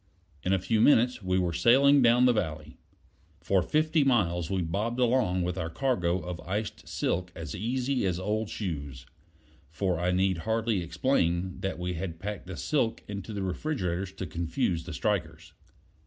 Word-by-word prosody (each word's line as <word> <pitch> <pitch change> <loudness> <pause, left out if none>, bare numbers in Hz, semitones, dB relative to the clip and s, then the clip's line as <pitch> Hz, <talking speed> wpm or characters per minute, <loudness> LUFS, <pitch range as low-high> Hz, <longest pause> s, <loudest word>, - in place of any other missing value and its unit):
In 90 - -1
a 95 - +4
few 110 +4 +1
minutes 125 -1 +4
we 95 -1 0
were 90 -2 0
sailing 135 - +5
down 120 +1 +5
the 125 - +5
valley. 80 -7 -4 0.6
For 95 -2 +2
fifty 155 - +2
miles 90 - +1
we 95 -2 0
bobbed 105 +9 -2
along 120 -8 +2
with 90 +1 -2
our 80 - -2
cargo 90 -5 0
of 90 -1 -6
iced 100 +7 -4
silk 90 0 -2
as 80 -3 -6
easy 125 +5 -1
as 90 -1 -1
old 105 +3 -1
shoes; 70 - -5 0.6
for 85 +2 -1
I 90 +1 0
need 95 -1 +1
hardly 110 0 0
explain 90 -2 0
that 95 -3 -3
we 90 +1 -3
had 85 -1 -5
packed 100 -1 -5
the 90 -2 -6
silk 130 -7 0
into 100 +1 -6
the 100 -2 -3
refrigerators 95 - -2
to 95 - -5
confuse 85 +1 -2
the 90 - -6
strikers. 85 -5 -2
95 Hz, 170 wpm, -28 LUFS, 85-115 Hz, 0.6 s, sailing